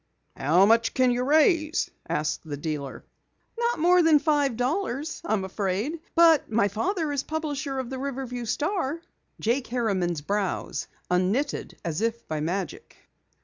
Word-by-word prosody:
"How 170 +7 +4
much 230 +2 +3
can 255 -1 +4
you 245 +1 0
raise?" 310 +3 +3 0.2
asked 150 0 -1
the 150 -3 -5
dealer. 145 -3 -5 0.5
"Not 470 +1 0
more 355 +3 +5
than 325 -2 +6
five 290 -5 +1
dollars, 290 +2 -2
I'm 205 -3 0
afraid. 205 - -2 0.2
But 330 -7 +5
my 210 -2 +3
father 320 - -1
is 285 -2 0
publisher 290 -3 -3
of 260 -1 -4
the 260 - -4
Riverview 260 -3 -4
Star." 305 - -1 0.4
Jake 240 +3 0
Harriman's 195 -9 -1
brows 200 +4 -2 0.2
unknitted 195 +11 0
as 165 +1 -2
if 230 +1 -2
by 155 -1 -2
magic. 175 +2 -4
245 Hz, 145 wpm, -26 LUFS, 195-305 Hz, 0.5 s, than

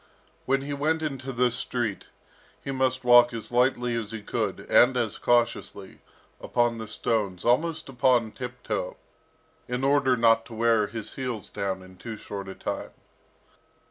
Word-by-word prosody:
When 135 +1 +2
he 145 +1 -4
went 155 +3 0
into 135 -3 -4
the 125 0 +2
street, 120 -4 -3 0.6
he 140 - -3
must 130 -1 0
walk 120 -1 +6
as 115 - -7
lightly 125 0 +2
as 115 -3 -2
he 110 -2 -6
could, - - -2
and 125 +1 +4
as 115 -4 -1
cautiously, 115 -5 0 0.4
upon 120 -1 0
the 110 - -6
stones, 100 -4 -1
almost 155 +7 +1
upon 125 -3 +2
tiptoe, 125 -7 -5 0.7
in 125 +2 -3
order 135 -2 +3
not 115 -1 +4
to 115 - -10
wear 115 -2 +3
his 110 0 -6
heels 125 -6 -4
down 95 -1 -3
in 95 0 -15
too 110 +3 -7
short 100 -1 -7
a 95 - -7
time. - - -4
120 Hz, 155 wpm, -26 LUFS, 110-130 Hz, 0.7 s, walk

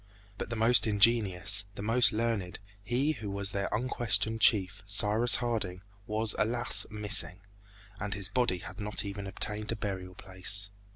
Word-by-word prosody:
But - - -5
the 120 - -4
most 115 +1 +4
ingenious, 105 -2 +3
the 100 - -7
most 115 +3 +3
learned, 110 -5 -3 0.3
he 125 +7 -1
who 110 -9 -7
was 100 0 -2
their 100 0 -3
unquestioned 115 -1 -1
chief, 95 -5 +2
Cyrus 105 +3 +3
Harding, 105 -7 -4 0.2
was, 110 +1 +1
alas! 120 +3 +3
missing, 105 -4 +3 0.6
and 105 -2 -4
his 100 -2 0
body 120 -7 -1
had 95 +2 -11
not 105 0 -4
even 100 0 -7
obtained 105 +2 -3
a - - -3
burial 95 -3 -6
place. 100 +2 -1
105 Hz, 155 wpm, -29 LUFS, 100-115 Hz, 0.6 s, most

